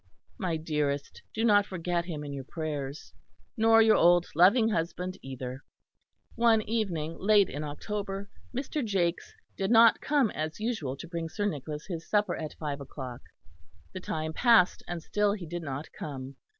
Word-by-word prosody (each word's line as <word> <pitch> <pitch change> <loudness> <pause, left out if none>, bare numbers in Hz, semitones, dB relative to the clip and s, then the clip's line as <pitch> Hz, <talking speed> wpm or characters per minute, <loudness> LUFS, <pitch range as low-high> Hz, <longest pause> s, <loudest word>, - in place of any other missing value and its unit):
My 180 -6 -1
dearest, 150 -3 -2
do 225 +1 -1
not 205 -2 +5
forget 175 -2 -2
him 155 -4 -5
in 145 -1 -6
your 135 -1 -5
prayers 145 -1 -5 0.4
nor 225 -1 +6
your 220 -1 +5
old 175 +1 +5
loving 200 +8 +5
husband 180 -1 -2
either." 130 0 -6 0.7
One 230 -2 +4
evening 180 -8 -2
late 205 -1 +4
in 145 +3 -4
October 195 +6 -4 0.2
Mr. 270 +3 -3
Jakes 185 -5 -1 0.2
did 195 - -1
not 230 -1 +6
come 285 -7 +2
as 155 +3 -4
usual 210 - -2
to 170 - -8
bring 165 -1 -4
Sir 205 +4 -2
Nicholas 150 -4 -4
his 170 -3 -6
supper 210 0 +2
at 155 -2 -6
five 145 -2 -4
o'clock; 130 -3 -7 0.7
the 185 - -5
time 160 -3 -3
passed 230 -3 +4
and 175 -2 -5
still 205 +2 +1
he 195 -4 -6
did 175 +2 -5
not 145 -1 -5
come. 135 -2 -7
175 Hz, 165 wpm, -29 LUFS, 150-210 Hz, 0.7 s, nor